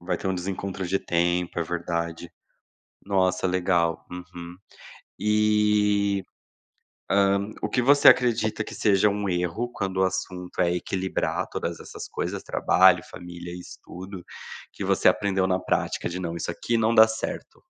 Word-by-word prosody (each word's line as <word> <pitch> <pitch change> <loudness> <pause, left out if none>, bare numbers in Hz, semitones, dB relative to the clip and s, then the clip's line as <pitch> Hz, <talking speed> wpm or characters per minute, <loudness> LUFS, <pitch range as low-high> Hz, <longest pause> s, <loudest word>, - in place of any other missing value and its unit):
Vai 85 - -2
ter - - -5
um 95 - 0
desencontro 95 +1 -4
de 95 +3 0
tempo, 85 0 0
é - - +1
verdade. 85 0 -4 0.8
Nossa, 95 -2 +1
legal, 90 -2 0
uhum. 90 -1 -9 0.6
E, 105 -1 +2 0.9
hã, 100 +1 +2
o - - -1
que 125 - +1
você 140 +3 +5
acredita 115 -3 +4
que - - -9
seja 100 0 +3
um 100 0 -2
erro 90 +7 -1
quando 95 -2 -3
o 95 - +3
assunto 90 -1 -4
é 85 0 +2
equilibrar 95 +1 -2
todas - - -4
essas - - -9
coisas, - - -4
trabalho, - - +4
família 85 -1 -9
e 90 - -7
estudo, 90 +1 -10 0.5
que - - -6
você - - +2
aprendeu 95 -2 0
na 95 0 +1
prática - - -1
de 90 +1 -5
não, 85 -2 -4
isso 85 - -3
aqui 115 +7 -1
não 115 +1 +2
dá 110 0 +8
certo? 110 0 -6
95 Hz, 150 wpm, -25 LUFS, 90-105 Hz, 0.9 s, dá